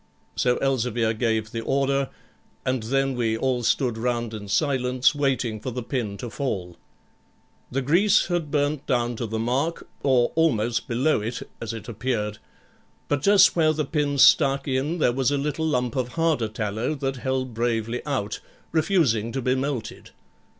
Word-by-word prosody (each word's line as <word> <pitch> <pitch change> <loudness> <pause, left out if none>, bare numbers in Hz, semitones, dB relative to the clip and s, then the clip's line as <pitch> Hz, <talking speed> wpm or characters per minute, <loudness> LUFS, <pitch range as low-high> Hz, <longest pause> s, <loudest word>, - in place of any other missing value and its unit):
So 125 -1 +2
Elzevir 120 -4 +1
gave 110 -1 -1
the 115 - -3
order, 135 +2 0 0.6
and 130 -1 0
then 135 +4 0
we 115 -3 0
all 130 0 0
stood 120 -1 +1
round 120 -1 -1
in 105 -2 -7
silence, 130 +1 +2
waiting 130 -6 0
for 130 - -5
the 125 0 -4
pin 115 -5 -3
to 120 - -6
fall. 95 -11 -3 0.9
The 135 +2 -2
grease 175 +10 +4
had 175 -4 -2
burnt 145 -1 0
down 120 -2 0
to 115 - -3
the 110 +1 -3
mark, 130 +9 -1
or 125 -3 +3
almost 120 -8 +1
below 125 +2 +1
it, 115 +2 -5
as 115 -1 -3
it 115 -2 -8
appeared; 110 -2 -2 0.7
but 145 -2 +1
just 195 +2 +6
where 155 -2 +3
the 155 -1 -1
pin 145 -1 -1
stuck 140 0 +5
in 140 +5 0
there 125 -7 +2
was 130 0 +1
a 145 - 0
little 150 +3 -1
lump 125 -5 0
of 125 -2 -2
harder 165 -8 +1
tallow 110 +6 -2
that 135 -1 -3
held 130 -1 -2
bravely 115 0 -1
out, 130 -8 -2 0.3
refusing 155 - +2
to 135 - -1
be 130 - +2
melted. 130 -3 -3
130 Hz, 165 wpm, -24 LUFS, 115-140 Hz, 0.9 s, just